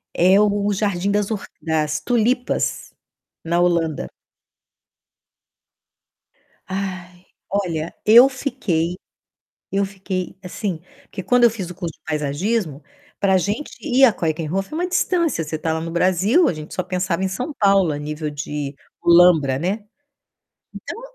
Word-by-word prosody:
É 185 +3 +5
o 205 0 +2
jardim 200 -2 -1
das 205 +1 0
orq 210 -2 -4
das 155 -2 -1
tulipas 245 +5 0 0.5
na 170 +1 0
Holanda. 170 -4 0 2.6
Ai, 185 -2 -5 0.2
olha, 170 -5 -2
eu 235 +5 +9
fiquei 205 - -2 0.8
eu 200 0 +2
fiquei 190 -2 -5
assim, 180 -2 -4 0.2
porque 190 - -8
quando 245 +3 +4
eu 235 - +7
fiz 195 -6 -6
o - - -10
curso 170 -3 -5
de - - -28
paisagismo, 155 +2 -2 0.4
pra 190 -1 +3
gente 205 - -2
ir 270 -2 +2
à 255 - +8
Keukenhof 165 +2 -2
é - - -5
uma 350 +3 0
distância. 345 - +1
Você 155 +1 -4
tá 160 +1 -2
lá 160 - -1
no 165 +1 -5
Brasil, 185 - +3
a - - -1
gente 155 0 -9
só 185 - -2
pensava 185 0 -2
em 190 - 0
São 250 +11 -4
Paulo, 195 -5 +3
a - - -4
nível 150 +1 -4
de 145 -1 -5 0.3
Holambra, 170 -6 +5
né. 195 +8 -2 0.9
Então, 460 - -8
185 Hz, 140 wpm, -21 LUFS, 160-210 Hz, 2.6 s, eu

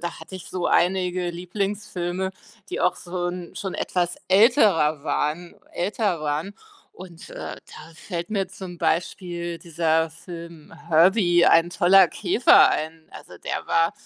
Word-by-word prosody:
da 170 - -5
hatte 190 - -11
ich 180 - -11
so 180 -1 -2
einige 180 -1 +1
Lieblingsfilme, 190 0 -3 0.4
die - - -3
auch 180 0 +2
so 175 0 -4
'n 175 -1 -7
schon 195 -2 -4
etwas 175 -1 -1
älterer 190 - +4
waren 165 +3 -2 0.2
älter 195 -2 -1
waren 155 +6 -3 0.4
und, 175 -3 -12
äh, - - -10 0.2
da 160 +2 -14
fällt 170 +2 -6
mir 195 -3 -1
zum 185 -3 -9
Beispiel 170 0 -2
dieser 165 -1 0
Film 170 -1 -11 0.2
„Herbie- 175 +1 +4
Ein 165 +1 +5
toller 185 +1 +5
Käfer" 215 +7 +4
ein. 160 +1 -4
Also, - - -12
der - - -5
war 165 0 +2
175 Hz, 140 wpm, -23 LUFS, 165-190 Hz, 0.4 s, Ein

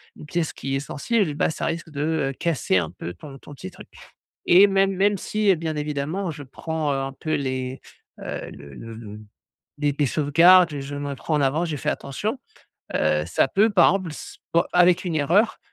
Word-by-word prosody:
une - - -11
pièce 165 +1 -2
qui 135 - -5
est - - +2
essentielle, 155 +6 -1
ben, 145 - +1
ça 160 - -4
risque 165 0 -3
de, 145 -2 -5 0.3
heu, - - -8
casser 135 - 0
un 85 -3 -1
peu 85 -1 -7
ton 135 - -11
ton 145 - -12
petit 95 - -8
truc, - - -13 0.6
et 190 +4 +7
même 195 0 +2
même 200 +2 +2
si 210 0 +1
bien 160 -1 -3
évidemment, 150 +5 -3
je 150 -2 -9
prends, 155 +2 -3
heu, - - -1
un 135 0 -3
peu 155 +3 -4
les, 130 -2 -3 0.4
heu, - - -6
le 70 -1 -12
le 115 - -9
le 105 -2 -9 0.6
les 145 -1 0
les 145 - +2
sauvegardes, 165 +3 +5
je 140 +1 -6
me 145 0 -4
prends 155 +4 -3
en 150 - +2
avant, 145 +5 +1
j'ai 160 -3 -3
fait - - -1
attention. 210 - -3 0.6
Heu, 75 0 +1
ça 85 +9 +1
peut 210 +8 +3
par 195 -4 +5
exemple 190 -4 -3
s - - -10 0.2
bon 170 - +4
avec 180 0 +5
une 170 -3 -2
erreur, 175 +10 +2
150 Hz, 205 wpm, -23 LUFS, 135-175 Hz, 0.6 s, et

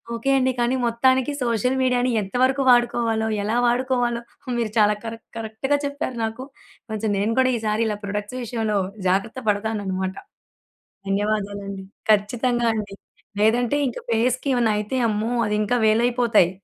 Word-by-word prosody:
Okay 275 +4 0
అండి, 260 0 +2
కానీ 240 +2 +2
మొత్తానికి 260 +3 +2
సోషల్ 245 +3 0
మీడియాని 250 0 +2
ఎంత 195 +3 -8
వరకు 270 +1 +2
వాడుకోవాలో, 235 -2 +2 0.2
ఎలా 220 +3 0
వాడుకోవాలో 245 -1 0 0.4
మీరు 220 -3 -1
చాలా 210 0 +4
కరెక్ట్, 225 0 -7
కరెక్ట్‌గా 225 +6 -1
చెప్పారు 280 -3 -4
నాకు. 225 +4 -5 0.5
కొంచెం 215 0 -2
నేను 210 +3 0
కూడా 255 0 +4
ఈసారి 215 +1 0 0.2
ప్రొడక్ట్స్ 205 +4 -4
విషయంలో 220 -3 -1 0.3
జాగ్రత్త 200 +7 0
పడతానన్నమాట. 200 -3 -1 0.9
ధన్యవాదాలండి. 200 -1 -2 0.3
ఖచ్చితంగా 235 +3 +2
అండి. 205 -2 -4 0.5
లేదంటే 240 +5 +3
ఇంకా 240 - -6
ఫేస్‌కి 250 +4 +1
ఏమైనా 235 -3 +2
అయితే 210 +5 -2
అమ్మో! 215 +3 -1 0.2
అది 210 - 0
ఇంకా 245 +4 +1
వేలైపోతాయి. 230 -4 +3
230 Hz, 135 wpm, -23 LUFS, 210-245 Hz, 0.9 s, చాలా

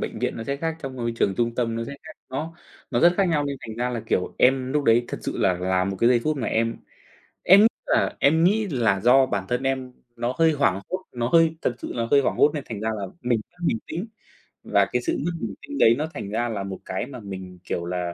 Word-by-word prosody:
bệnh - - -4
viện - - -2
nó 115 - -5
sẽ 140 +2 -2
khác, 160 +2 -3
trong 135 -2 -6
môi 120 -1 -2
trường 100 - +1
trung 120 -1 0
tâm 115 -2 -1
nó 115 - -2
sẽ 140 - -7
khác. 160 - -10 0.2
Nó 160 +5 -4 0.4
nó - - +1
rất 175 +1 +6
khác 195 - +3
nhau 150 -4 +1
nên 140 -1 -3
thành 110 - -7
ra 125 +1 -1
là, 120 -2 -3
kiểu, 90 - -1
em 130 0 +3
lúc 150 -1 +1
đấy 120 0 +4
thật - - -4
sự - - -4
là 95 - +3
là 95 +1 0
một 95 +1 -3
cái 115 - +5
giây 125 -1 +4
phút 155 -1 +1
mà 120 - -2
em 115 +1 0 0.7
em 195 +3 +7
nghĩ 220 - +7 0.2
là - - +1
em 160 +4 +4
nghĩ 210 +4 +3
là 115 -8 +1
do 130 +5 +5
bản 100 -6 -2
thân 125 +2 -1
em 130 -1 -2 0.2
nó 120 +2 -2
hơi 165 -1 +5
hoảng 140 -10 +1
hốt, 185 +1 -3
nó 120 -1 -2
hơi 165 +2 +4
thật 120 - 0
sự - - -6
là 115 -1 -2
hơi 140 - +6
hoảng 135 - 0
hốt 150 - +5
nên 145 - -4
thành 110 -3 -5
ra 110 - -1
là 100 - -4 0.2
mình 120 -2 +1
mất 175 0 -10
bình 115 - +1
tĩnh 175 +8 -4 0.6
và - - +3
cái - - 0
sự 335 -1 -1
mất 175 - 0
bình 110 -3 -3
tĩnh 285 0 -7
đấy 115 - +6
nó 155 +2 -2
thành 100 - -6
ra 120 +3 -1
là 100 -3 -3
một 95 -1 -6
cái 95 - -3
mà 130 -3 -9
mình, 95 -3 -8
kiểu 85 -1 -3
là, 90 -1 -3
125 Hz, 275 wpm, -24 LUFS, 110-150 Hz, 0.7 s, em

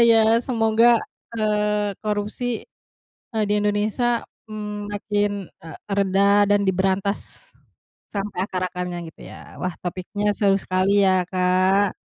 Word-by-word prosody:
ya 225 -1 +5 0.2
semoga, 230 -1 +4 0.4
eee, 210 -1 +1
korupsi, 215 +3 -2 0.7
eee, 220 -1 +1
di 205 - +1
Indonesia, 215 +4 0 0.3
mmm, 210 -1 -5
makin, 205 0 0 0.3
eee, 160 - -9 0.2
reda 200 +1 +4
dan 205 0 +4
diberantas, 195 - -1 0.6
sampai 200 -2 -4
akar-akarnya 180 -1 -3
gitu - - -22
ya - - -13
wah 180 -1 -2
topiknya 195 +4 -2
seru 200 -2 +3
sekali 195 +2 +2
ya, 185 -1 +3
Kak. 185 +2 +2
205 Hz, 115 wpm, -23 LUFS, 190-210 Hz, 0.7 s, ya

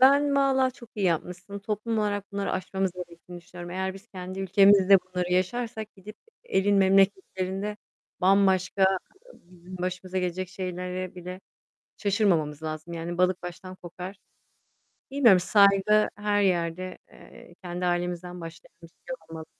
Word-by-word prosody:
Ben 280 +2 +6
valla 265 -2 +3
çok 235 -2 -15
iyi 200 -3 0
yapmışsın. 180 +4 -2
Toplum 215 +2 -2
olarak 205 -1 -2
bunları 200 0 -2
aşmamız 190 0 -1
gerektiğini 175 0 -10
düşünüyorum. 175 0 -10
Eğer 190 +1 -2
biz 195 +3 -13
kendi 185 -1 -7
ülkemizde 195 0 +6
bunları 180 -1 -3
yaşarsak, 220 +4 -1
gidip 205 +3 -12 0.3
e 480 - 0
elin 200 +1 +3
memleketlerinde 195 +1 +2 0.4
bambaşka 190 0 +4 0.5
bizim 180 +1 -13
başımıza 185 +1 -3
gelecek 180 0 -2
şeylere 180 0 -5
bile 180 +1 -8 0.6
şaşırmamamız 175 -8 +1
lazım. 155 +2 -5
Yani, 170 +1 -4
balık 180 -1 +2
baştan 185 +1 -8
kokar. 180 +2 -9 0.9
Bilmiyorum 240 -9 +6
saygı 200 +2 +4
her 205 0 +1
yerde, 185 -1 0
eee, 175 - -15
kendi 180 0 -3
ailemizden 175 0 -2
başlayalım. 165 0 -10
Bir - - -10
şey 260 - -8
olmaz. 160 -1 -7
185 Hz, 135 wpm, -27 LUFS, 180-200 Hz, 0.9 s, Ben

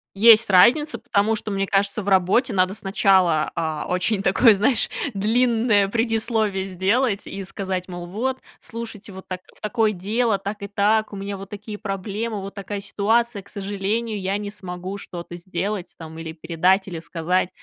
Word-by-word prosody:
Есть 225 +1 +7
разница, 240 +11 +5
потому 210 +2 +1
что, 215 - -5
мне 195 -1 0
кажется, 200 +2 +1
в 200 - -6
работе 195 +7 +3
надо 185 0 +2
сначала, 190 -6 +2
а, 160 -2 -2
очень 190 +3 0
такое, 210 +4 +5
знаешь, 220 +4 +1 0.2
длинное 220 -1 +2
предисловие 220 -3 0
сделать 200 +4 0
и 195 - -6
сказать, 190 -1 -4
мол: 175 -1 -6
"Вот, 255 +8 -2 0.2
слушайте, 225 -3 -8
вот 190 0 -10
так 185 -1 -5 0.2
в - - -21
такое 220 0 +1
дело, 215 +4 0
так 205 +1 -6
и 200 - -4
так, 215 +2 +1
у - - -6
меня 200 +1 -4
вот 195 - -9
такие 210 +1 -8
проблемы, 205 +2 -3
вот 195 - -7
такая 200 0 -5
ситуация, 215 +3 +1
к 200 - -20
сожалению, 205 +2 -2
я 190 +1 -1
не 205 0 -4
смогу 185 0 -6
что-то 175 -3 -8
сделать, 185 +1 -4
там, 160 -1 -10
или 165 -1 -6
передать, 180 +4 +1
или 170 - -5
сказать". 170 +2 -1
200 Hz, 170 wpm, -23 LUFS, 185-220 Hz, 0.2 s, Есть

